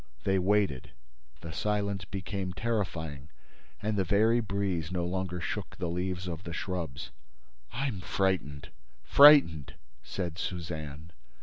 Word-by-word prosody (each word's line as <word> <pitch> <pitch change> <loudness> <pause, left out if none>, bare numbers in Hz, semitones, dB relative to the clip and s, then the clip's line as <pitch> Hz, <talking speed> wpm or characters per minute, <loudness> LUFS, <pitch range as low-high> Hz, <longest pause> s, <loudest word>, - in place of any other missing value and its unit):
They 95 0 +2
waited. 95 -9 +1 0.5
The 80 -1 -7
silence 100 0 -1
became 95 0 -4
terrifying 85 - -3 0.5
and 105 0 0
the - - +3
very 110 +5 +3
breeze 100 -6 -2
no 90 -1 -1
longer 90 0 -2
shook 80 - -4
the 90 - -2
leaves 90 +1 -3
of 85 -1 -4
the 85 - -6
shrubs. 80 -9 -4 0.6
"I'm 120 -6 -2
frightened—frightened," 75 - +3 0.3
said 85 -3 -4
Suzanne. 80 -4 -5
90 Hz, 115 wpm, -30 LUFS, 80-100 Hz, 0.6 s, the